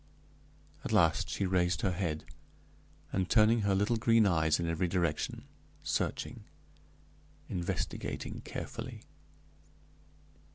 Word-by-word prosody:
At - - -4
last - - +3
she 100 - -1
raised 90 -1 +1
her 95 - +1
head, 85 -4 -2 0.9
and 95 -1 0
turned 110 0 +5
her 100 -1 +2
little 105 +4 +2
green 115 0 +4
eyes 80 -4 +3
in 85 - -1
every 85 +2 0
direction, 85 -4 -1 0.4
searching, 120 -3 -2 1.0
investigating 85 -1 -3
carefully. - - -6
95 Hz, 100 wpm, -32 LUFS, 85-105 Hz, 1.0 s, turned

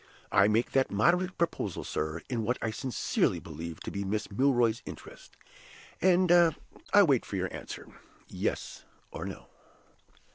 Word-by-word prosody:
I 100 +1 +5
make 110 +3 +1
that 135 -1 +2
moderate 180 - +2
proposal, 110 - -2
sir, 80 +2 -3
in 120 -3 -2
what 120 +3 0
I 110 - -2
sincerely 130 +2 0
believe 80 +1 -7
to - - -5
be 100 - -3
Miss 105 +2 -3
Milroy's 120 -1 +2
interest, - - -11 0.6
and 180 -1 +4
I 175 +4 +3
wait 140 - +2
your 95 -2 -2
answer, - - -8 0.4
Yes - - -3 0.3
or - - -6
No." 60 - -7
115 Hz, 140 wpm, -29 LUFS, 100-165 Hz, 0.6 s, I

